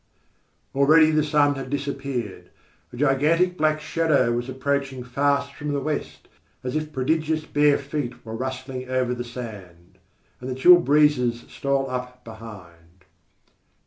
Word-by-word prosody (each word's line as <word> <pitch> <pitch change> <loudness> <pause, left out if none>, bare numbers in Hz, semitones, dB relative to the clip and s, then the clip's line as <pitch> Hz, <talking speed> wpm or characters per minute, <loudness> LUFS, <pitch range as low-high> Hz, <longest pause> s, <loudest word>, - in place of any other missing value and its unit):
Already 155 +3 +5
the 155 -1 +2
sun 145 -1 +3
had 135 -2 -6
disappeared. 135 -6 -4 0.4
A - - -10
gigantic 150 +6 +2
black 155 -2 +1
shadow 155 -6 +1
was 120 +2 -2
approaching 135 0 -2
fast 140 +2 0
from 150 0 -4
the 140 - 0
west, 135 - -4 0.4
as 125 +3 -4
if 155 0 -2
prodigious 155 +3 -1
bare 145 -1 +3
feet 140 -4 -5
were 110 - -7
rustling 130 +1 -5
over 130 -1 0
the 120 0 -4
sand. 105 -8 -10 0.4
And 125 - -7
the 130 - -3
chill 175 +7 +7
breezes 145 -7 +2
stole 140 -1 -1
up 125 -1 -6
behind. 95 -6 -13
135 Hz, 140 wpm, -24 LUFS, 125-150 Hz, 0.4 s, chill